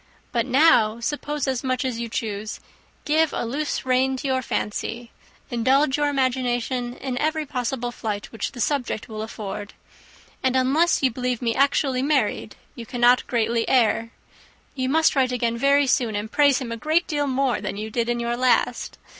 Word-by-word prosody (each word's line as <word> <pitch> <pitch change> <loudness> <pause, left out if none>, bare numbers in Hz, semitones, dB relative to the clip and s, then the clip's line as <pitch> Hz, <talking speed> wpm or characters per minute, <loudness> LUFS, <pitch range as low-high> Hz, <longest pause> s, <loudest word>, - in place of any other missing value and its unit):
But 235 0 0
now 255 -5 +4
suppose 295 +3 -3
as 260 -1 -1
much 255 0 -1
as 245 -3 -2
you 235 -1 -4
choose; 215 -2 -4 0.5
give 310 +1 +2
a - - -2
loose 285 +6 -2
to 260 +1 +1
your 260 -2 0
fancy, 230 +1 -3 0.4
indulge 265 +4 +2
your 295 0 +1
imagination 250 -2 -1
in 255 -2 -4
every 310 0 0
possible 245 -2 -3
flight 215 -4 -5
which 225 - -4
the 245 - -6
subject 265 -6 -1
will 215 -2 -6
afford, 210 -2 -6 0.7
and 260 -1 +1
unless 275 +6 +2
you 260 - +4
believe 250 0 -2
me 235 -2 0
actually 270 -1 +2
married, 270 -7 0 0.2
you 235 - -8
cannot 245 +2 +3
greatly 230 -1 +1
err. 230 -2 +2 0.6
You 260 -1 -2
must 320 +2 +3
write 260 -2 +2
again 235 -2 0
very 280 +3 +3
soon, 240 -4 +1
and 210 +2 -4
praise 285 -2 +4
him 255 -4 -5
a 230 - -3
great 315 +7 +1
deal 290 -3 -1
more 265 -1 0
than - - -4
you 215 +1 -5
did 235 +1 -1
in 240 0 0
your 235 0 -1
last. 250 0 +1
255 Hz, 175 wpm, -23 LUFS, 235-275 Hz, 0.7 s, now